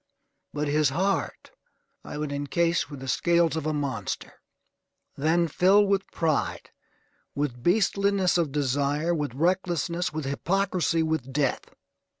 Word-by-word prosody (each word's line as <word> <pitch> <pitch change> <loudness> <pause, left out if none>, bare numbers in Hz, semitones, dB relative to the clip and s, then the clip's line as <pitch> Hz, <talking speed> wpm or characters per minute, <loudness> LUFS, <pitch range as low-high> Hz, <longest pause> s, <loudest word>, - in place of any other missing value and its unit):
But 150 0 -2
his 150 0 +2
heart 190 +7 -2 0.5
I - - -7
would 150 -1 -3
encase 145 +3 0
with 145 -3 -9
the 135 - -7
scales 170 +3 +2
of 155 -1 -2
a - - +1
monster, 140 -8 -3 0.8
then 165 +4 +2
fill 190 +6 +4
with 195 -1 0
pride, 160 -4 -1 0.6
with 140 -4 -2
beastliness 200 - +2
of 165 -5 +1
desire, 145 +3 0
with 145 -6 -3
recklessness, 175 +1 0
with 155 -1 -4
hypocrisy, 175 +3 0
with 155 -5 -2
death. 140 -1 -1
155 Hz, 130 wpm, -26 LUFS, 145-175 Hz, 0.8 s, fill